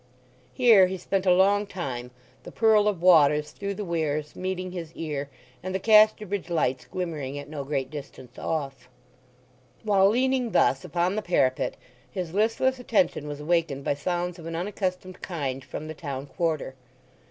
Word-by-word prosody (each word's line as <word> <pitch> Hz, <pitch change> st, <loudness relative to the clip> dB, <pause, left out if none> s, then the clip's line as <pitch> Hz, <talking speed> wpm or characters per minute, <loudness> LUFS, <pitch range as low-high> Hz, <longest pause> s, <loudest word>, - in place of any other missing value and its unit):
Here 225 Hz, -7 st, +6 dB
he 190 Hz, +1 st, -4 dB
spent 190 Hz, +1 st, -2 dB
a -, -, +6 dB
long 200 Hz, +3 st, +4 dB
time, 130 Hz, -11 st, -5 dB, 0.3 s
the -, -, -11 dB
purl 220 Hz, -2 st, +4 dB
of 190 Hz, -5 st, -1 dB
waters 150 Hz, -4 st, +5 dB
through 200 Hz, 0 st, -5 dB
the 210 Hz, -, -5 dB
weirs 155 Hz, -3 st, -2 dB
meeting 185 Hz, 0 st, -3 dB
his 170 Hz, -3 st, -6 dB
ear, 145 Hz, -3 st, -4 dB, 0.3 s
and 185 Hz, +1 st, -4 dB
the -, -, 0 dB
Casterbridge 210 Hz, -2 st, +4 dB
lights 135 Hz, -6 st, 0 dB
glimmering 155 Hz, -7 st, -4 dB
at 145 Hz, -, -7 dB
no 145 Hz, -2 st, -5 dB
great 135 Hz, -2 st, -3 dB
distance 135 Hz, -4 st, -10 dB
off. 135 Hz, -5 st, -4 dB, 0.9 s
While 200 Hz, -2 st, +4 dB
leaning 255 Hz, +1 st, +1 dB
thus 135 Hz, -, +3 dB
upon 180 Hz, +2 st, 0 dB
the 215 Hz, -, -1 dB
parapet 130 Hz, -9 st, +1 dB, 0.3 s
his 180 Hz, -4 st, -5 dB
listless 230 Hz, +5 st, +1 dB
attention 185 Hz, -11 st, +1 dB
was 145 Hz, 0 st, -6 dB
awakened 155 Hz, -3 st, 0 dB
by -, -, +1 dB
sounds 175 Hz, +4 st, -3 dB
of 165 Hz, -, -9 dB
an 165 Hz, -, -4 dB
unaccustomed 185 Hz, 0 st, -3 dB
kind 135 Hz, -7 st, -4 dB
from 155 Hz, -, -7 dB
the 155 Hz, -, -5 dB
town 140 Hz, -4 st, -6 dB
quarter. 160 Hz, -3 st, -2 dB
175 Hz, 165 wpm, -26 LUFS, 145-195 Hz, 0.9 s, Here